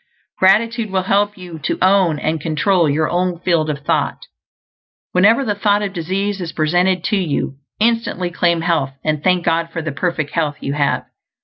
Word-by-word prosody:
Gratitude 220 +4 +3
will 190 -1 0
help 205 +2 +1
you 175 -3 -9
to 140 - -2
own 185 -4 +3
and 155 +1 -2
control 165 +2 +1
your 155 +2 +1
own 180 0 -1
field 170 -4 +1
of 145 -1 -4
thought. - - -1 0.9
Whenever 220 +9 +4
the 210 - 0
thought 205 0 +1
of 195 -1 -3
disease 195 +3 -2
is 170 -2 -4
presented 175 +3 +1
to 210 +3 +1
you, 150 -6 -2 0.2
instantly 220 -6 0
claim 170 -1 +1
health, 165 -5 0
and 155 -1 -1
thank 180 -2 +2
God 165 0 +1
for 165 -1 -4
the 155 - -3
perfect 155 -1 -2
health 150 -3 -1
you 140 - -3
have. 145 -1 0
175 Hz, 180 wpm, -18 LUFS, 155-195 Hz, 0.9 s, Whenever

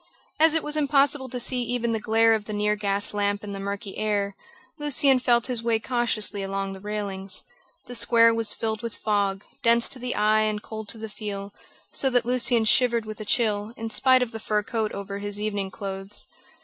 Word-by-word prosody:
As 320 0 +6
it 320 - +1
was 300 0 0
impossible 280 -2 +2
to 250 - -4
see 250 +1 +1
even 240 -1 -1
the 225 - -1
glare 225 +1 +3
of 215 -2 -1
the 215 - -6
near 210 0 +1
gas 205 -1 -1
lamp 205 0 0
in 205 - -6
the 195 - -5
murky 200 0 -5
air, 205 -2 -1 0.4
Lucian 280 -2 +3
felt 240 -2 +2
his 250 -3 0
way 230 -1 +2
cautiously 225 -3 0
along 195 0 -3
the 190 - -9
railings. 200 -2 -3 0.4
The 245 - -9
square 230 -1 +4
was 225 -1 0
filled 220 -1 -2
with 230 -2 -5
fog, 200 -2 0 0.2
dense 235 0 +4
to 260 - -1
the 250 0 -3
eye 215 +1 +3
and 215 -1 0
cold 220 0 -8
to - - -1
the 220 0 -6
feel, 205 -2 -6 0.4
so 270 - +1
that 245 -2 +2
Lucian 240 -2 +2
shivered 235 0 +3
with 215 0 -8
the 215 - -6
chill, 215 0 0
in 225 0 -5
spite 255 +2 +5
of 235 - -5
the 225 - -6
fur 210 -1 0
coat 220 0 -2
over 200 0 -6
his 205 0 -3
evening 205 -2 -2
clothes. 195 0 -5
220 Hz, 210 wpm, -25 LUFS, 205-240 Hz, 0.4 s, As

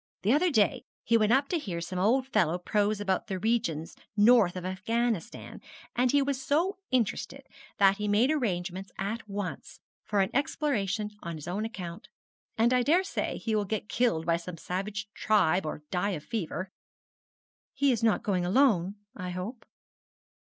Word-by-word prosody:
The 215 +5 +4
other 345 +5 +3
day 215 -10 +2 0.2
he 230 - +2
went 215 -1 +4
up 275 +3 +4
to 345 - 0
hear 185 - -4
some 175 +2 -4
old 245 +7 +3
fellow 175 - +1
prose 205 +3 0
about 190 -2 -1
the 190 -3 -2
regions 195 -7 -1 0.2
north 210 -4 +5
of 180 -1 -5
Afghanistan, 215 +2 -2 0.3
and 250 +1 +3
he 285 -1 +4
was 270 -1 -2
so 340 +8 +1
interested 255 +2 -1 0.3
that 195 0 +5
he 210 -1 -2
made 215 +7 +3
arrangements 190 - -2
at 210 +3 -4
once 200 -2 -5 0.2
for 205 -1 +1
an 190 +3 0
exploration 220 -7 0
on 170 -1 -5
his 155 0 -9
own 200 +5 -2
account. 180 -6 -7 0.5
And 235 +2 +4
I 250 - +4
daresay 350 +9 +1
he 220 -2 -1
will 210 - +2
get 210 +1 -3
killed 225 -11 +1
by 170 0 +2
some 170 0 -8
savage 195 +5 -4
tribe, 190 -5 +2
or 150 - -5
die 185 0 0
of 150 - -11
fever.' 185 -3 -4 1.0
'He 275 0 +3
is 235 - 0
not 225 -2 +2
going 185 -4 0
alone, 195 -2 +3 0.2
I 180 -2 -5
hope?' 185 +7 -5
210 Hz, 170 wpm, -29 LUFS, 185-240 Hz, 1.0 s, north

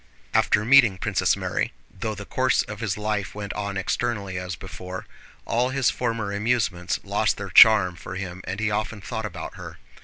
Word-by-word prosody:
After 105 - +3
meeting 120 -6 +6
Princess - - +1
Mary, - - -2 0.2
though 110 +3 -4
the 105 +1 -8
course 130 +4 +1
of 105 -1 -8
his 105 -5 -2
life 105 -3 -2
went 100 -1 -5
on 100 -1 -3
externally 100 -1 -2
as 90 -1 -5
before, 95 0 -8 0.4
all 120 +2 +1
his 130 -3 +2
former 115 -4 -2
amusements 100 -4 0
lost - - 0
their - - -6
charm 100 -5 +7
for 90 +2 -8
him 90 -1 -6
and 95 +2 -4
he 110 -1 0
often 105 +1 -2
thought 110 +1 -4
about 90 -4 -8
her. - - -9
105 Hz, 180 wpm, -24 LUFS, 95-115 Hz, 0.4 s, charm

